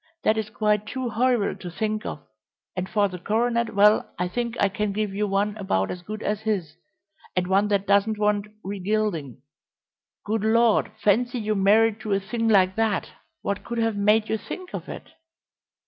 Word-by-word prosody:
That 215 Hz, -, +3 dB
is 220 Hz, -1 st, -2 dB
quite 210 Hz, -1 st, 0 dB
too 255 Hz, +2 st, -3 dB
horrible 240 Hz, -2 st, +1 dB
to 180 Hz, -, -6 dB
think 215 Hz, +5 st, -2 dB
of, -, -, -6 dB, 0.5 s
and 185 Hz, 0 st, -2 dB
as -, -, -19 dB
for 205 Hz, -2 st, +3 dB
the 180 Hz, -2 st, -8 dB
coronet, 235 Hz, +3 st, 0 dB
well, 210 Hz, +1 st, +4 dB
I 180 Hz, 0 st, -1 dB
think 235 Hz, +3 st, -3 dB
I -, -, +4 dB
can 200 Hz, +1 st, -2 dB
give 210 Hz, -1 st, -2 dB
you 205 Hz, +1 st, 0 dB
one 200 Hz, +1 st, 0 dB
about 95 Hz, -, 0 dB
as 180 Hz, -, -6 dB
good 215 Hz, +4 st, -7 dB
as 210 Hz, 0 st, -1 dB
his, 190 Hz, -8 st, -2 dB, 0.6 s
and 180 Hz, -1 st, +1 dB
one 195 Hz, +3 st, +2 dB
that 200 Hz, -1 st, +1 dB
doesn't 200 Hz, +2 st, +3 dB
want 210 Hz, 0 st, +1 dB, 0.2 s
re 200 Hz, +1 st, -5 dB
gilding. 180 Hz, -, -2 dB, 0.8 s
Good 215 Hz, 0 st, -1 dB
Lord, 225 Hz, -1 st, +3 dB
fancy 240 Hz, +5 st, +2 dB
you 215 Hz, -2 st, -1 dB
married 210 Hz, +2 st, +4 dB
to 215 Hz, -2 st, -2 dB
a 195 Hz, -, +2 dB
thing 225 Hz, +4 st, -2 dB
like 190 Hz, -3 st, +4 dB
that! 225 Hz, -1 st, 0 dB, 0.3 s
What 200 Hz, -, -2 dB
could 235 Hz, -, -5 dB
have 225 Hz, -2 st, +1 dB
made 210 Hz, +2 st, +3 dB
you 220 Hz, -, -1 dB
think 370 Hz, -, -8 dB
of -, -, -6 dB
it?" -, -, -9 dB
210 Hz, 195 wpm, -25 LUFS, 195-220 Hz, 0.8 s, well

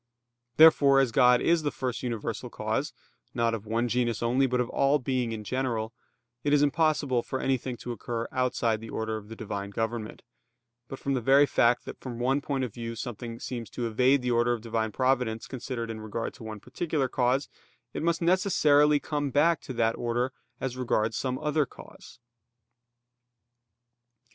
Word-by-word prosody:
Therefore 145 Hz, -4 st, +7 dB
as 135 Hz, -3 st, +2 dB
God 125 Hz, +1 st, +5 dB
is 170 Hz, -1 st, +3 dB
the 150 Hz, -, 0 dB
first 130 Hz, -3 st, -4 dB
universal 120 Hz, -4 st, -4 dB
cause, -, -, -2 dB, 0.4 s
not 115 Hz, -1 st, +1 dB
of 110 Hz, -1 st, -5 dB
one 115 Hz, +2 st, 0 dB
genus 120 Hz, -1 st, 0 dB
only, 130 Hz, +3 st, +2 dB
but 125 Hz, 0 st, 0 dB
of 125 Hz, -, +1 dB
all 140 Hz, +2 st, +3 dB
being 130 Hz, -3 st, -1 dB
in 110 Hz, -1 st, -5 dB
general, 115 Hz, -2 st, -2 dB, 0.5 s
it 145 Hz, -, +1 dB
is 145 Hz, 0 st, +5 dB
impossible 145 Hz, -4 st, +2 dB
for 130 Hz, -, -4 dB
anything 130 Hz, -2 st, -1 dB
to 120 Hz, -, -6 dB
occur 115 Hz, +1 st, -4 dB
outside 120 Hz, -3 st, 0 dB
the 115 Hz, -, -8 dB
order 110 Hz, 0 st, -3 dB
of 105 Hz, -1 st, -10 dB
the 115 Hz, -, -7 dB
Divine 100 Hz, -2 st, -5 dB
government; 115 Hz, +1 st, -4 dB, 0.6 s
but 135 Hz, -, -7 dB
from 140 Hz, -, -2 dB
the 130 Hz, -, 0 dB
very 135 Hz, +4 st, +6 dB
fact 120 Hz, -3 st, +2 dB
that -, -, -8 dB
from 125 Hz, -3 st, -7 dB
one 130 Hz, +4 st, +1 dB
point 140 Hz, -2 st, -2 dB
of 120 Hz, -5 st, -4 dB
view 115 Hz, -1 st, -5 dB
something 115 Hz, 0 st, -6 dB
seems 120 Hz, -3 st, -5 dB
to 120 Hz, -, -4 dB
evade 125 Hz, +4 st, +3 dB
the 125 Hz, -, 0 dB
order 120 Hz, +1 st, +3 dB
of 120 Hz, -, -4 dB
Divine 110 Hz, -1 st, -2 dB
providence 125 Hz, -3 st, 0 dB
considered 120 Hz, -3 st, -5 dB
in 110 Hz, -1 st, -7 dB
regard 110 Hz, +1 st, -4 dB
to -, -, -13 dB
one 110 Hz, -1 st, -7 dB
particular 155 Hz, -, -2 dB
cause, 130 Hz, +2 st, +1 dB, 0.5 s
it -, -, -4 dB
must 170 Hz, +1 st, 0 dB
necessarily 150 Hz, -5 st, +4 dB
come 145 Hz, -2 st, -2 dB
back 155 Hz, +4 st, +3 dB
to 130 Hz, -, -7 dB
that 115 Hz, -1 st, +1 dB
order 120 Hz, +2 st, -1 dB, 0.3 s
as 130 Hz, -2 st, -3 dB
regards 115 Hz, -3 st, 0 dB
some 130 Hz, +1 st, -2 dB
other 150 Hz, -1 st, 0 dB
cause. -, -, -14 dB
125 Hz, 180 wpm, -28 LUFS, 115-135 Hz, 0.6 s, Therefore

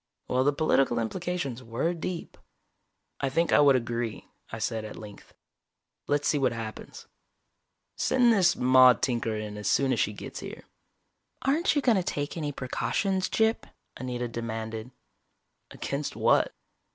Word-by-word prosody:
Well, 130 Hz, +1 st, +2 dB
the 145 Hz, -, +4 dB
political 135 Hz, -4 st, +2 dB
implications 140 Hz, +1 st, -3 dB
were 125 Hz, +8 st, -1 dB
deep. 170 Hz, +1 st, -5 dB, 0.8 s
"I 135 Hz, -, 0 dB
think 165 Hz, +5 st, +1 dB
I -, -, +6 dB
would 140 Hz, -2 st, +6 dB
agree," 120 Hz, -2 st, -2 dB, 0.3 s
I 115 Hz, -, -5 dB
said 110 Hz, 0 st, -2 dB
at 105 Hz, -, -8 dB
length. 105 Hz, -2 st, -12 dB, 0.7 s
"Let's 145 Hz, 0 st, +1 dB
see 145 Hz, -, +2 dB
what 130 Hz, -3 st, +2 dB
happens. 115 Hz, -1 st, -7 dB, 0.9 s
Send 245 Hz, -2 st, +4 dB
this 180 Hz, -4 st, +4 dB
Maude 130 Hz, -2 st, +6 dB
Tinker 115 Hz, -3 st, 0 dB
in 105 Hz, -1 st, -5 dB
as 105 Hz, -1 st, -4 dB
soon 135 Hz, +4 st, +3 dB
as 115 Hz, -, -1 dB
she 105 Hz, -, +1 dB
gets -, -, -8 dB
here." -, -, -8 dB, 0.8 s
"Aren't 305 Hz, +5 st, +2 dB
you 290 Hz, -, +1 dB
going 235 Hz, -5 st, +4 dB
to 185 Hz, -, +1 dB
take 145 Hz, -4 st, -3 dB
any 150 Hz, -3 st, -2 dB
precautions, 185 Hz, +8 st, -1 dB
Gyp?" 220 Hz, +1 st, +1 dB, 0.3 s
Anita 125 Hz, -1 st, -4 dB
demanded. 110 Hz, 0 st, -5 dB, 0.8 s
"Against 140 Hz, +1 st, -4 dB
what?" -, -, +3 dB
130 Hz, 150 wpm, -28 LUFS, 115-165 Hz, 0.9 s, I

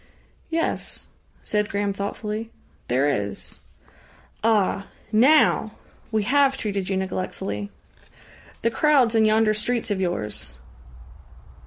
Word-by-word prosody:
"Yes," 330 Hz, 0 st, -2 dB, 0.4 s
said 210 Hz, 0 st, 0 dB
Graham 200 Hz, 0 st, -1 dB
thoughtfully. 210 Hz, +2 st, -4 dB, 0.4 s
"There 130 Hz, +4 st, +2 dB
is." 100 Hz, -8 st, -3 dB, 0.8 s
"Ah! 205 Hz, -3 st, +2 dB, 0.2 s
Now! 235 Hz, -2 st, +4 dB, 0.4 s
We 215 Hz, -1 st, +1 dB
have 270 Hz, +3 st, +3 dB
treated 200 Hz, -5 st, -2 dB
you 190 Hz, -, 0 dB
neglectfully." 145 Hz, -, -3 dB, 0.9 s
"The 230 Hz, -, +2 dB
crowds 265 Hz, -2 st, +4 dB
in 220 Hz, -1 st, +4 dB
yonder 215 Hz, 0 st, +4 dB
streets 225 Hz, +1 st, -1 dB
of 195 Hz, -2 st, 0 dB
yours." 105 Hz, -, -3 dB
210 Hz, 105 wpm, -24 LUFS, 190-230 Hz, 0.9 s, Now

